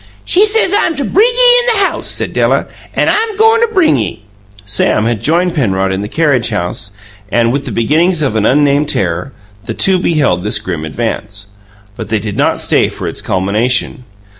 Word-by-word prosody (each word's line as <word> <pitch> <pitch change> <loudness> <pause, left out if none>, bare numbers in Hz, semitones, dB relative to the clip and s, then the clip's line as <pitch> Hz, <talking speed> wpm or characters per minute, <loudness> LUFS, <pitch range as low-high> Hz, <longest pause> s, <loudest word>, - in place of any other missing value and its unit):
"She 390 +4 +3
says 425 -2 +2
I'm 330 -5 +1
to 285 - -3
bring 405 - +3
ye - - +4
in 485 - -1
the 400 -3 +3
house," - - -5
said - - -2
Della, - - +1 0.3
"an' - - +1
I'm 440 -2 0
goin' 445 +1 +4
to 470 - +3
bring 370 -7 +3
ye!" 110 -1 -4 0.4
Sam 100 +1 +1
had 115 -3 -1
joined 175 +3 +1
Penrod 95 - 0
in 95 +1 -2
the 105 - -4
carriage 140 -3 0
house, 100 0 -3 0.4
and, 115 0 +2
with 140 +2 -2
the - - -5
beginnings 155 +8 +1
of 130 -6 -1
an 110 - +1
unnamed 145 +3 +2
terror, 90 +6 -2 0.3
the 115 - -5
two 190 -1 +3
beheld 145 - 0
this 105 0 0
grim 85 -7 -5
advance. 105 +2 -4 0.5
But - - -7
they 110 - 0
did 105 -1 -5
not - - 0
stay - - +2
for - - -7
its - - -3
culmination. 110 +8 -1
130 Hz, 195 wpm, -13 LUFS, -, 0.5 s, ye